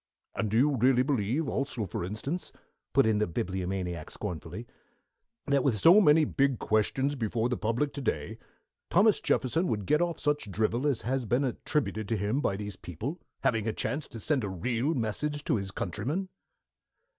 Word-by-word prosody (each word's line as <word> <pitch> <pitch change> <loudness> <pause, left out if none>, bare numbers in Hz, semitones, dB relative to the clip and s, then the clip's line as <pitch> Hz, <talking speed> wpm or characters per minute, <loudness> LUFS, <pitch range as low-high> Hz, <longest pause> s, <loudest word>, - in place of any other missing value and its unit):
"And 110 - -1
do 110 - +1
you 140 +2 +3
really 125 +1 +4
believe, 135 +2 0
also 135 -6 -2
for 85 - -4
instance," 110 - -4 0.4
put - - +4
in 110 -1 +2
the 105 - +1
Bibliomaniac 90 -1 -3
scornfully, 85 +6 -6 0.8
"that 140 -2 +2
with 125 -6 +2
so 175 - +7
many 155 -3 +6
big 140 -2 +1
questions 130 +7 +1
before 115 -2 -1
the 125 - 0
public 120 +6 0
to 140 - -5
day 75 - -2 0.5
Thomas 205 +4 +4
Jefferson 160 +8 +1
would 105 - -1
get 150 - +3
off 175 -1 -1
such 145 -7 0
drivel 110 +7 0
as 135 -6 0
has 130 +1 -1
been 125 +6 +1
attributed 125 -4 -2
to 115 - +1
him 105 +8 0
by 95 - 0
these 105 -2 -6
people, 120 - -6 0.2
having 115 -5 +1
a 110 - 0
chance 145 +1 -2
to 115 - -9
send 135 +2 0
a 100 - -2
real 120 - -1
message 145 +6 -2
to 120 - +1
his 100 -1 -3
countrymen?" 125 - -3
120 Hz, 180 wpm, -29 LUFS, 105-145 Hz, 0.8 s, so